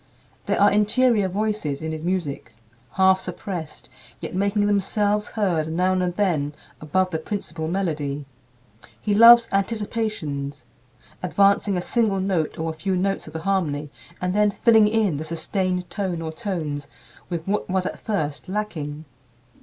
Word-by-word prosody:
There -, -, +1 dB
are 205 Hz, +1 st, +6 dB
interior 210 Hz, +1 st, +3 dB
voices 195 Hz, -7 st, -2 dB
in 160 Hz, -, -2 dB
his 155 Hz, 0 st, -5 dB
music, 170 Hz, -9 st, -2 dB, 0.4 s
half 190 Hz, 0 st, +4 dB
suppressed, 180 Hz, -3 st, -6 dB, 0.3 s
yet -, -, -6 dB
making 200 Hz, +2 st, +1 dB
themselves 205 Hz, +1 st, +1 dB
heard 175 Hz, -8 st, 0 dB
now 180 Hz, +3 st, +2 dB
and 180 Hz, -1 st, 0 dB
then 155 Hz, -8 st, 0 dB, 0.3 s
above 185 Hz, +5 st, 0 dB
the 160 Hz, -, -1 dB
principal 160 Hz, -3 st, -4 dB
melody. 150 Hz, -6 st, -2 dB, 0.7 s
He 210 Hz, -, -1 dB
loves 230 Hz, +2 st, +9 dB
"anticipations" 195 Hz, -, -2 dB, 0.6 s
advancing 200 Hz, +1 st, +3 dB
a 180 Hz, -, -2 dB
single 215 Hz, -4 st, +1 dB
note 185 Hz, -5 st, -1 dB
or 160 Hz, 0 st, -2 dB
a -, -, -7 dB
few 175 Hz, +4 st, -2 dB
notes 195 Hz, 0 st, -1 dB
of 155 Hz, -, -10 dB
the 160 Hz, -, -4 dB
harmony 155 Hz, -6 st, -1 dB, 0.3 s
and 180 Hz, 0 st, -1 dB
then 210 Hz, +1 st, +4 dB
filling 220 Hz, 0 st, +4 dB
in 210 Hz, -7 st, +1 dB
the 155 Hz, -, -4 dB
sustained 180 Hz, +3 st, -2 dB
tone 190 Hz, -5 st, -2 dB
or 160 Hz, -1 st, -4 dB
tones 155 Hz, -6 st, -4 dB, 0.4 s
with 170 Hz, -1 st, -4 dB
what 205 Hz, 0 st, -1 dB
was 185 Hz, 0 st, 0 dB
at -, -, -4 dB
first 170 Hz, -6 st, -3 dB
lacking. 160 Hz, -7 st, -4 dB
185 Hz, 150 wpm, -23 LUFS, 160-205 Hz, 0.7 s, loves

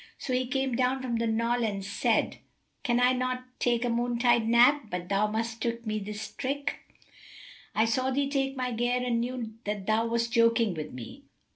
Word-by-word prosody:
So 260 Hz, -, -4 dB
he 250 Hz, 0 st, +1 dB
came 265 Hz, -1 st, -1 dB
down 255 Hz, +2 st, +1 dB
from 240 Hz, -2 st, -1 dB
the 230 Hz, 0 st, 0 dB
knoll 230 Hz, +2 st, +1 dB
and 200 Hz, -3 st, -2 dB
said, 200 Hz, -, +1 dB, 0.4 s
"Can 245 Hz, -4 st, +1 dB
I 250 Hz, +1 st, +4 dB
not 255 Hz, 0 st, -1 dB, 0.2 s
take 240 Hz, 0 st, +1 dB
a -, -, +1 dB
noontide 240 Hz, -1 st, +2 dB
nap[FN#281] 240 Hz, +2 st, +5 dB
but 180 Hz, -1 st, -4 dB
thou 200 Hz, +2 st, +2 dB
must 225 Hz, +1 st, -3 dB
trick 235 Hz, 0 st, -2 dB
me 215 Hz, 0 st, -1 dB
this 210 Hz, +1 st, -6 dB
trick? 280 Hz, +1 st, -3 dB, 1.0 s
I 220 Hz, -, +4 dB
saw 255 Hz, +3 st, +1 dB
thee 275 Hz, +1 st, +1 dB
take 270 Hz, -1 st, -1 dB
my 250 Hz, -1 st, -1 dB
gear 245 Hz, +2 st, 0 dB
and 235 Hz, -2 st, +1 dB
knew 240 Hz, -2 st, -4 dB
that 205 Hz, -2 st, -3 dB
thou 220 Hz, +2 st, +2 dB
wast 235 Hz, 0 st, 0 dB
joking 230 Hz, -3 st, +4 dB
with 155 Hz, -2 st, -6 dB
me." 125 Hz, -3 st, -9 dB
235 Hz, 190 wpm, -28 LUFS, 220-255 Hz, 1.0 s, nap[FN#281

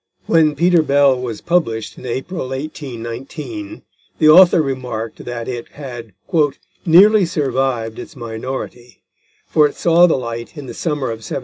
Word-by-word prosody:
When 155 Hz, -3 st, +3 dB
Peter 175 Hz, 0 st, +4 dB
Bell 140 Hz, -2 st, +3 dB
was 120 Hz, -4 st, -5 dB
published 115 Hz, -11 st, -1 dB
in 130 Hz, -, -10 dB
April 130 Hz, +4 st, -4 dB
1819, 135 Hz, -, -7 dB, 0.3 s
the 155 Hz, -, +4 dB
author 175 Hz, +2 st, +7 dB
remarked 125 Hz, -6 st, -4 dB
that 120 Hz, -1 st, -5 dB
it 120 Hz, -2 st, -5 dB
had 120 Hz, -7 st, -9 dB, 0.7 s
"nearly 200 Hz, +5 st, +7 dB
survived 130 Hz, -6 st, -1 dB
its -, -, -10 dB
minority; 120 Hz, +1 st, -7 dB, 0.4 s
for 150 Hz, -1 st, +3 dB
it -, -, -10 dB
saw 170 Hz, +1 st, +4 dB
the 160 Hz, -, +1 dB
light 115 Hz, +2 st, -6 dB
in 145 Hz, -, -7 dB
the -, -, -8 dB
summer 150 Hz, -7 st, -2 dB
of 115 Hz, -, -5 dB
1798." 110 Hz, +5 st, -5 dB
135 Hz, 145 wpm, -18 LUFS, 120-160 Hz, 0.7 s, author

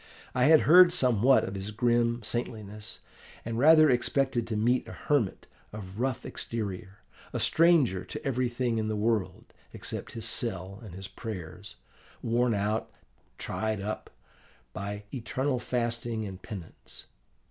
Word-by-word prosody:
I 125 Hz, 0 st, +3 dB
had 155 Hz, +1 st, +7 dB
heard 175 Hz, +2 st, +8 dB
somewhat 125 Hz, -2 st, +4 dB
of 95 Hz, -, -4 dB
his 95 Hz, +1 st, -5 dB
grim 120 Hz, +1 st, +1 dB
saintliness, 105 Hz, -2 st, -5 dB, 0.4 s
and 115 Hz, 0 st, -3 dB
rather 155 Hz, +2 st, +7 dB
expected 130 Hz, -1 st, +1 dB
to 115 Hz, -, -3 dB
meet 120 Hz, +4 st, +1 dB
a -, -, -8 dB
hermit 135 Hz, -10 st, -1 dB, 0.3 s
of 100 Hz, -1 st, -8 dB
rough 130 Hz, -1 st, -1 dB
exterior, 100 Hz, -3 st, -5 dB, 0.3 s
a -, -, -1 dB
stranger 155 Hz, -, +4 dB
to -, -, -8 dB
everything 125 Hz, -2 st, 0 dB
in 110 Hz, -, -1 dB
the 110 Hz, -, -1 dB
world, 105 Hz, -2 st, -1 dB, 0.2 s
except -, -, -5 dB
his 115 Hz, -1 st, -4 dB
cell 100 Hz, -4 st, -1 dB
and 95 Hz, -6 st, -10 dB
his 95 Hz, 0 st, -7 dB
prayers, 95 Hz, -, -8 dB, 0.5 s
worn 120 Hz, 0 st, +2 dB
out, 105 Hz, +2 st, -1 dB, 0.5 s
tried 110 Hz, -1 st, -2 dB
up, 105 Hz, +2 st, -5 dB, 0.6 s
by 100 Hz, +2 st, -5 dB
eternal 130 Hz, +2 st, -1 dB
fasting 115 Hz, -2 st, -2 dB
and 95 Hz, -2 st, -8 dB
penance. 100 Hz, -7 st, -10 dB
115 Hz, 135 wpm, -29 LUFS, 105-125 Hz, 0.6 s, heard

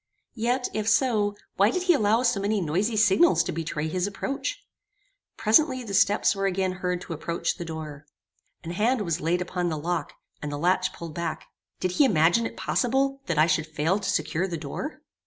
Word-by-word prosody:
Yet, 245 Hz, +2 st, 0 dB
if 215 Hz, 0 st, 0 dB
so, 215 Hz, -3 st, +2 dB, 0.2 s
why 200 Hz, +2 st, +5 dB
did 365 Hz, +9 st, -1 dB
he 365 Hz, -1 st, +5 dB
allow 225 Hz, -3 st, +2 dB
so 235 Hz, -5 st, +2 dB
many 205 Hz, +1 st, 0 dB
noisy 190 Hz, +7 st, 0 dB
signals 185 Hz, -5 st, +4 dB
to -, -, -3 dB
betray 155 Hz, -1 st, -3 dB
his 180 Hz, +4 st, -1 dB
approach? 275 Hz, -, -4 dB, 0.7 s
Presently 255 Hz, +3 st, +3 dB
the 205 Hz, -4 st, -7 dB
steps 205 Hz, +2 st, +3 dB
were 195 Hz, 0 st, 0 dB
again 190 Hz, 0 st, 0 dB
heard 180 Hz, -1 st, -3 dB
to 170 Hz, -, -6 dB
approach 170 Hz, +2 st, -2 dB
the 175 Hz, -, -5 dB
door. 155 Hz, -2 st, -7 dB, 0.6 s
An 165 Hz, -, -5 dB
hand 225 Hz, +7 st, +1 dB
was 170 Hz, -3 st, -2 dB
laid 175 Hz, +3 st, +1 dB
upon 180 Hz, 0 st, -2 dB
the 160 Hz, -, -2 dB
lock, 170 Hz, +3 st, -3 dB, 0.3 s
and 150 Hz, -, -4 dB
the 145 Hz, -, -3 dB
latch 185 Hz, +3 st, +1 dB
pulled 165 Hz, -2 st, -8 dB
back. 170 Hz, +1 st, -4 dB, 0.3 s
Did 185 Hz, -, -1 dB
he 280 Hz, +10 st, +4 dB
imagine 180 Hz, +1 st, +3 dB
it -, -, -12 dB
possible 270 Hz, +2 st, 0 dB
that 170 Hz, -3 st, -1 dB
I 155 Hz, -, +6 dB
should 160 Hz, -1 st, 0 dB
fail 155 Hz, +5 st, 0 dB
to 200 Hz, -1 st, -3 dB
secure 190 Hz, -2 st, 0 dB
the 170 Hz, -3 st, -4 dB
door? 295 Hz, -, -6 dB
185 Hz, 195 wpm, -26 LUFS, 165-220 Hz, 0.7 s, I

